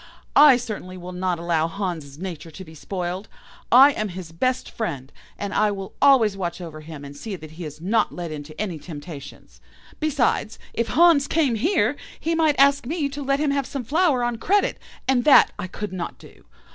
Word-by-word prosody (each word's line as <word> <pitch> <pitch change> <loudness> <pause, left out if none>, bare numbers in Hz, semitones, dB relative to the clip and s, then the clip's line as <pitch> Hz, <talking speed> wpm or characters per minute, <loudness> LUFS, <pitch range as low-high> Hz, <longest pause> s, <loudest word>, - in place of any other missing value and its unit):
I 290 -3 +8
certainly 210 -6 -6
will 180 0 -8
not 180 -1 -1
allow 165 -1 0
Hans' 165 -7 -5
nature 170 -3 -6
to 185 +4 -10
be 160 - -13
spoiled. 180 +4 -5 0.4
I 270 +4 +9
am 215 -6 -3
his 180 -2 -8
best 255 +10 -1
friend, 140 - -4 0.3
and 200 -1 -4
I 215 - +3
will 195 -2 -6
always 250 -8 +5
watch 180 -3 -4
over 160 -3 -8
him, 155 -2 -9
and 140 0 -10
see 200 +7 -6
that 155 -3 -11
he 165 +2 -8
is 150 0 -8
not 210 +6 +1
led 175 -2 -6
into 155 0 -8
any 185 -7 -3
temptations. 145 -3 -10 0.4
Besides, 285 -7 0 0.2
if 235 - -1
Hans 330 -4 +5
came 295 -6 +2
here, 290 - +1 0.2
he 330 - -1
might 315 -3 +2
ask 280 -2 +4
me 300 -1 -1
to 285 +1 -6
let 275 0 +1
him 295 -1 +1
have 280 -2 -1
some 275 -3 -5
flour 295 -1 +2
on 240 -1 -1
credit, 400 - +1 0.3
and 255 -2 +3
that 295 - +7
I 195 - -3
could 205 +2 -6
not 175 -2 -5
do. - - -17
200 Hz, 195 wpm, -23 LUFS, 170-275 Hz, 0.4 s, I